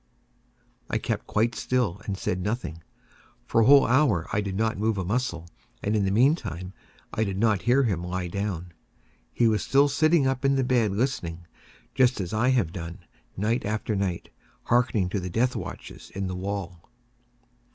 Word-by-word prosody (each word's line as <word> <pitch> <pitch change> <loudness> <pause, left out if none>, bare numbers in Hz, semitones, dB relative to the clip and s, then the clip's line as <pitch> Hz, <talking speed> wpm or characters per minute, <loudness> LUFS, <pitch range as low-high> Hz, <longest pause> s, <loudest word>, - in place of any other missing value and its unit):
I - - 0
kept - - -3
quite 115 +3 +1
still 120 -7 -1
and 100 -2 -3
said 90 0 -2
nothing. 100 -6 -3 0.6
For 115 - +2
a - - +4
whole 140 0 +8
hour 120 - +3
I 105 - +2
did 100 -2 -4
not 110 0 0
move 110 0 +1
a 95 - -2
muscle, 95 -6 -2 0.4
and 105 +2 0
in 100 -2 +2
the - - +1
meantime 100 - +1 0.4
I 110 - +1
did 100 -3 -3
not 110 -2 +2
hear 130 +3 +3
him 95 -8 -1
lie 90 0 -3
down. 90 -2 -4 0.6
He 120 - +2
was 110 -1 +2
still 140 +1 +4
sitting 155 +1 +3
up 130 0 0
in 135 0 +3
the 135 - +2
bed 125 -4 +2
listening;—just 105 +3 -2
as 95 +1 -4
I 110 +4 +2
have 115 -11 +1
done, 85 -2 -7 0.3
night 110 +5 0
after 105 +1 -2
night, 95 -3 -2 0.3
hearkening 115 -5 +2
to 100 - -1
the 90 0 -5
death 125 +8 +1
watches - - -8
in 100 0 -2
the 90 -1 -3
wall. 90 -3 -5
105 Hz, 175 wpm, -26 LUFS, 90-125 Hz, 0.6 s, whole